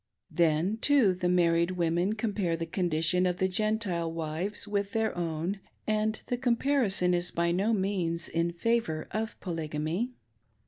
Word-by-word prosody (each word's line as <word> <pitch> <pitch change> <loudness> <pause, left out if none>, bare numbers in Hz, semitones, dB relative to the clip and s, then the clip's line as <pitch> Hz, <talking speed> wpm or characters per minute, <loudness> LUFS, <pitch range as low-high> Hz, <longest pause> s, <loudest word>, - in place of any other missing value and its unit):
Then, 165 +5 +2
too, 245 -6 +4
the 180 0 -1
marrifed 170 0 +3
women 175 +3 +1
compare 205 -6 -1
the 165 - -3
condition 175 +1 +1
of 180 -1 -1
the 190 0 +2
Gentile 190 -4 0
wives 165 +6 -3
with 200 -1 -2
their 225 -1 0
own, 170 +3 -2 0.3
and 215 0 0
the 245 - -2
cornparison 240 -7 +3
is 175 0 +2
by 170 0 0
no 195 +6 +1
means 185 -5 -1
in 170 +1 0
favor 170 -4 -1
of 220 +1 -3
Polygamy. 165 +7 -3
180 Hz, 145 wpm, -29 LUFS, 170-215 Hz, 0.3 s, too